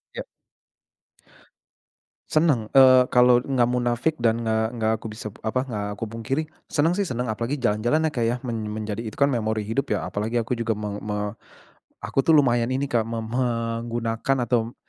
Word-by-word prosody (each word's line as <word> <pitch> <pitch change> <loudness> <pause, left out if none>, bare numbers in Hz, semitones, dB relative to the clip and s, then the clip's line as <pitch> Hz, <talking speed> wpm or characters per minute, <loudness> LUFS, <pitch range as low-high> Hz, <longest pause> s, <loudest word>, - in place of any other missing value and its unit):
Ya. - - -4 2.1
Senang, 150 -9 +2
eee, 130 -1 +7
kalau 125 0 +5
nggak 125 -3 +1
munafik 125 +5 0
dan 115 -1 +1
nggak 110 0 +1
nggak 110 0 +1
aku 110 - -8
bisa, 110 0 -7 0.2
apa, 130 +4 -1
nggak 105 -4 -3
aku 115 - -2
pungkiri, 115 +7 -2 0.3
senang 160 +4 +2
sih, 200 - +1
senang, 125 -7 -3
apalagi, 115 +6 -2
jalan-jalan 120 +8 +1
ya, - - -2
Kak, 120 - 0
ya. 120 +2 +1
Men 115 -2 -3
menjadi, 110 +1 -4
itu 110 - -7
kan, 140 - +5
memori 110 -5 -1
hidup, 125 +5 -2
ya, - - -1
apalagi 110 +3 -1
aku 115 +2 -2
juga 115 -1 -2
meng 105 -1 -4
me 105 0 -3 0.7
aku - - -4
tuh, 160 - +6
lumayan 120 -5 +4
ini 140 +1 -2
Kak, 115 -2 +1
meng 115 0 -4
me 125 - -2 0.5
menggunakan, 115 +3 -1
atau 120 -1 +1
120 Hz, 175 wpm, -24 LUFS, 110-130 Hz, 2.1 s, eee